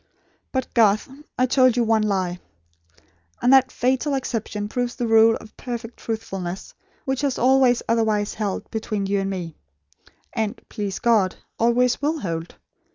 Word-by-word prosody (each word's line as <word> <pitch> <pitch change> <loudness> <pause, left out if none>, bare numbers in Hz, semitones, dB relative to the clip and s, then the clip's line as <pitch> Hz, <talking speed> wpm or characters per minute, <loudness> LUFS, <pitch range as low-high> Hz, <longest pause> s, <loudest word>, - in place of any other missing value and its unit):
But, 260 -1 -3
Garth, 215 -1 +3 0.3
I 255 - +3
told 255 -1 +4
you 240 - +3
one 225 -1 +2
lie; 185 -4 -1 1.0
and 250 - +4
that 265 -1 +5
fatal 265 +3 0
exception 220 -5 -3
proves 245 +2 -2
the 240 - -2
rule 225 0 +5
of 215 - -11
perfect 240 -1 -6
truthfulness, 195 -5 -5 0.3
which 265 0 -1
has 280 -3 0
always 255 -1 +4
otherwise 220 -2 +1
held, 205 -3 -4
between 215 -2 -2
you 200 +1 0
and 195 0 -2
me; 175 -4 -5 0.8
and, 220 +1 -2
please 205 -3 -4
God, 215 -6 +2 0.2
always 240 +2 +2
will 305 +1 0
hold. 165 -2 -4
225 Hz, 150 wpm, -23 LUFS, 205-250 Hz, 1.0 s, that